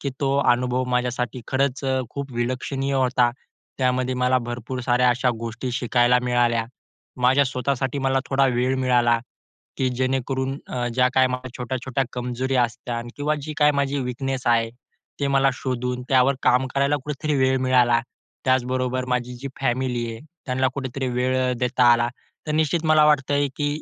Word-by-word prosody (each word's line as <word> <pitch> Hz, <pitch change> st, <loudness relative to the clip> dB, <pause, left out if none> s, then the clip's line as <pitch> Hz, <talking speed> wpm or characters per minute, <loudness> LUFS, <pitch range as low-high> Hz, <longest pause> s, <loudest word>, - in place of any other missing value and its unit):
की 140 Hz, -, -2 dB
तो 140 Hz, 0 st, +1 dB
अनुभव 125 Hz, -1 st, +2 dB
माझ्यासाठी 125 Hz, -1 st, -2 dB
खरंच 135 Hz, 0 st, 0 dB, 0.3 s
खूप 140 Hz, -2 st, -6 dB
विलक्षणीय 130 Hz, +3 st, -2 dB
होता. 125 Hz, -2 st, +2 dB, 0.5 s
त्यामध्ये 130 Hz, 0 st, +1 dB
मला 125 Hz, 0 st, +2 dB
भरपूर 120 Hz, +1 st, -5 dB
साऱ्या 125 Hz, 0 st, +2 dB
अशा 125 Hz, +1 st, +1 dB
गोष्टी 115 Hz, +2 st, -4 dB
शिकायला 125 Hz, 0 st, +3 dB
मिळाल्या. 120 Hz, -2 st, +1 dB, 0.6 s
माझ्या 130 Hz, +3 st, +5 dB
स्वतःसाठी 135 Hz, +1 st, -2 dB
मला 135 Hz, 0 st, +1 dB
थोडा 135 Hz, 0 st, +3 dB
वेळ 125 Hz, +2 st, +1 dB
मिळाला, 120 Hz, -2 st, +3 dB, 0.6 s
की 130 Hz, -, +1 dB
जेणेकरून 130 Hz, +1 st, -1 dB
अ, 120 Hz, -1 st, -2 dB
ज्या 125 Hz, 0 st, +4 dB
काही 130 Hz, -1 st, +5 dB
माझ्या 125 Hz, 0 st, -4 dB
छोट्या-छोट्या 130 Hz, +2 st, -2 dB
कमजोरी 125 Hz, +2 st, -3 dB
असते 120 Hz, 0 st, -1 dB, 0.2 s
किंवा 150 Hz, +1 st, 0 dB
जी 155 Hz, +1 st, -5 dB
काही 150 Hz, -1 st, +5 dB
माझी 140 Hz, 0 st, 0 dB
वीकनेस 130 Hz, +1 st, -3 dB
आहे. 115 Hz, -1 st, +3 dB, 0.5 s
ते 140 Hz, -, +1 dB
मला 135 Hz, 0 st, +3 dB
शोधून 125 Hz, -1 st, -3 dB
त्यावर 130 Hz, +1 st, +4 dB
काम 125 Hz, +1 st, +3 dB
करायला 140 Hz, +1 st, +2 dB
कुठेतरी 150 Hz, +1 st, -2 dB
वेळ 130 Hz, 0 st, +3 dB
मिळाला 125 Hz, -2 st, +3 dB, 0.4 s
त्याचबरोबर 130 Hz, 0 st, 0 dB
माझी 125 Hz, 0 st, -1 dB
जी 135 Hz, +3 st, -6 dB
फॅमिली 125 Hz, -2 st, 0 dB
आहे 115 Hz, -, -9 dB, 0.3 s
त्यांना 130 Hz, +1 st, +1 dB
कुठेतरी 130 Hz, -1 st, -3 dB
वेळ 125 Hz, +1 st, 0 dB, 0.2 s
देता 125 Hz, 0 st, +1 dB
आला 120 Hz, 0 st, +2 dB, 0.4 s
तर 150 Hz, -, -1 dB
निश्चित 160 Hz, +1 st, +1 dB
मला 155 Hz, -1 st, +5 dB
वाटतंय, 145 Hz, -1 st, +2 dB
की 145 Hz, -1 st, 0 dB
130 Hz, 155 wpm, -23 LUFS, 125-135 Hz, 0.6 s, माझ्या